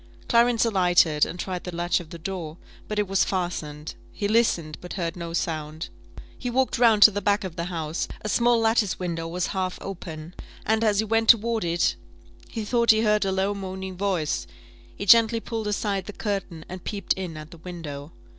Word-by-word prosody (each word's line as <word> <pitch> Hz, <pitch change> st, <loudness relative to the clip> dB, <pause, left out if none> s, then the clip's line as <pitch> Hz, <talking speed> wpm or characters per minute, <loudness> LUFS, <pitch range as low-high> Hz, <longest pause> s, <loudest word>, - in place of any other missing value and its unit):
Clarence 235 Hz, -1 st, +4 dB
alighted, 175 Hz, -7 st, +4 dB
and 180 Hz, -, -7 dB
tried 180 Hz, -1 st, -4 dB
the 180 Hz, -2 st, -6 dB
latch 175 Hz, +1 st, +1 dB
of 170 Hz, -3 st, -10 dB
the 170 Hz, -, -8 dB
door, 165 Hz, -2 st, -5 dB, 0.3 s
but 215 Hz, -, -4 dB
it 210 Hz, -1 st, +1 dB
was 195 Hz, 0 st, +3 dB
fastened; 155 Hz, -5 st, -3 dB, 0.2 s
he 205 Hz, -, -2 dB
listened, 200 Hz, -9 st, +2 dB
but 180 Hz, -, -7 dB
heard 170 Hz, -3 st, -3 dB
no 170 Hz, -2 st, -6 dB
sound; 155 Hz, -1 st, -3 dB, 0.5 s
he 245 Hz, -, -3 dB
walked 260 Hz, 0 st, +1 dB
round 225 Hz, -4 st, +6 dB
to 215 Hz, -, +10 dB
the 205 Hz, 0 st, -3 dB
back 205 Hz, +2 st, +2 dB
of 185 Hz, -3 st, -6 dB
the 170 Hz, -1 st, -3 dB
house: 165 Hz, -2 st, -3 dB, 0.2 s
a -, -, -3 dB
small 235 Hz, +3 st, +3 dB
lattice 225 Hz, -3 st, +2 dB
window 165 Hz, -2 st, -3 dB
was 175 Hz, +2 st, -2 dB
half 185 Hz, -1 st, -2 dB
open, 165 Hz, -3 st, -7 dB, 0.3 s
and, 220 Hz, +1 st, +2 dB
as 210 Hz, -2 st, +3 dB
he 220 Hz, -, +2 dB
went 225 Hz, +1 st, +1 dB
toward 230 Hz, -1 st, +5 dB
it, 170 Hz, -, +1 dB, 0.5 s
he 220 Hz, -2 st, -4 dB
thought 235 Hz, +1 st, +1 dB
he 220 Hz, 0 st, +7 dB
heard 210 Hz, -2 st, +2 dB
a 190 Hz, -, 0 dB
low 190 Hz, +2 st, 0 dB
moaning 190 Hz, -1 st, -6 dB
voice; 180 Hz, -5 st, -1 dB, 0.5 s
he 200 Hz, -, -5 dB
gently 230 Hz, +2 st, +6 dB
pulled 225 Hz, -2 st, -4 dB
aside 205 Hz, -2 st, -1 dB
the 210 Hz, -, -6 dB
curtain, 195 Hz, -7 st, -4 dB
and 185 Hz, 0 st, -8 dB
peeped 200 Hz, -3 st, -1 dB
in 180 Hz, -4 st, -6 dB
at 155 Hz, +1 st, -10 dB
the 170 Hz, -, -12 dB
window. 160 Hz, -4 st, -7 dB
190 Hz, 200 wpm, -25 LUFS, 170-215 Hz, 0.5 s, to